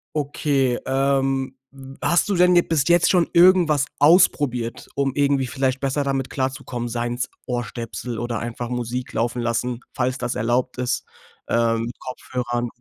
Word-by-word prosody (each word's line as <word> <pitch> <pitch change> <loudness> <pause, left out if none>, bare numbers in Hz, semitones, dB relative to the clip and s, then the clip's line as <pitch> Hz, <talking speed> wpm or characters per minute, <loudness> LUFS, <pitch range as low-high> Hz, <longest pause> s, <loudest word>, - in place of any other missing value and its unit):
Okay, 140 -3 0
ähm, 135 0 0 0.5
hast 175 +3 +2
du 200 - 0
denn 180 0 +5
bis 150 -4 +1
jetzt 175 0 +5
schon 175 -3 +3
irgendwas 170 -5 +5
ausprobiert, 145 -7 +3
um 135 -1 0
irgendwie 140 -2 +2
vielleicht 130 +1 -1
besser 140 +1 -1
damit 135 -2 -1
klarzukommen, 130 -2 -3
seien 120 +1 -2
es 125 +1 -3 0.2
Ohrstöpsel 120 -1 -4
oder 120 -1 -3
einfach 120 0 -5
Musik 125 +1 -4
laufen 120 +2 -1
lassen, 120 +1 -1
falls 130 0 -1
das 125 -1 -3
erlaubt 125 +3 0
ist, 125 -1 -1 0.4
ähm, 115 -1 +1
mit 120 - -7
Kopfhörern? 120 -1 -4
130 Hz, 145 wpm, -22 LUFS, 120-140 Hz, 0.5 s, denn